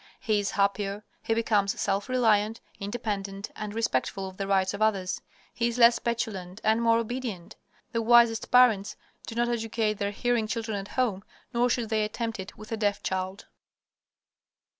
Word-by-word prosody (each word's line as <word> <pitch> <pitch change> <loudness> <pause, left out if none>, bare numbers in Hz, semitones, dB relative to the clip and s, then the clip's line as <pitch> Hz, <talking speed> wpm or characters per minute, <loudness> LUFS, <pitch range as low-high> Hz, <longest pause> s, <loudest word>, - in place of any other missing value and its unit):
He 215 -3 +1
is 200 - -1
happier. 200 0 0 0.2
He 225 - 0
becomes 210 -3 +1
self 200 +4 -1
reliant, 225 -3 +2 0.2
independent, 200 -2 -4
and 210 -1 -5
respectful 195 - -1
of 190 0 -10
the 195 - -3
rights 190 -1 +2
of 200 - -6
others. 195 -4 +1 0.3
He 235 - 0
is 235 0 -3
less 235 0 +6
petulant 210 -6 -3
and 220 +2 +3
more 230 0 +4
obedient. 230 -6 -4 0.4
The 230 - 0
wisest 235 0 +5
parents 240 -6 +4 0.3
do 230 - -6
not 240 +1 +2
educate 225 -2 -1
their 200 - 0
hearing 235 +1 0
children 220 -1 -3
at 195 - -7
home, 215 -7 +1 0.3
nor 240 +1 +2
should 235 -2 0
they 220 -1 +1
attempt 225 0 -3
it 190 +1 -8
with 215 +1 -11
a 225 - -1
deaf 205 -2 0
child. 190 +1 -3
215 Hz, 170 wpm, -27 LUFS, 200-230 Hz, 0.4 s, less